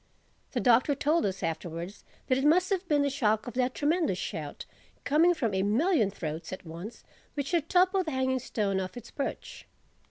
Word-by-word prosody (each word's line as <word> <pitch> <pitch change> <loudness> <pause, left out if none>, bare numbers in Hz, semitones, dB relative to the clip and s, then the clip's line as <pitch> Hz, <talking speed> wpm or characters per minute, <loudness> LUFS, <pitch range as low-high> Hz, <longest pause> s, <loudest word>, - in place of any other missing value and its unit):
The - - 0
Doctor 250 +4 +4
told 300 0 +2
us 195 0 -4
afterwards 170 +3 -4 0.2
that 255 - +2
it - - -1
must 360 +6 +4
have 380 -1 0
been 290 -3 +3
the 285 - +1
shock 220 -5 +1
of 245 - -6
that 250 0 0
tremendous 320 +3 +1
shout, - - -5 0.4
coming 330 +5 +4
from 230 -9 -1
a 190 - +1
million 225 - +2
throats 160 -5 -5
at 185 0 -7
once, 170 +8 -8 0.3
which 285 -2 -3
had 330 -3 0
toppled 370 0 +3
the - - -1
Hanging 260 -1 0
Stone 205 -6 -1
off 185 +3 -5
its 240 -1 -10
perch. 280 - -5
260 Hz, 190 wpm, -29 LUFS, 200-315 Hz, 0.4 s, Doctor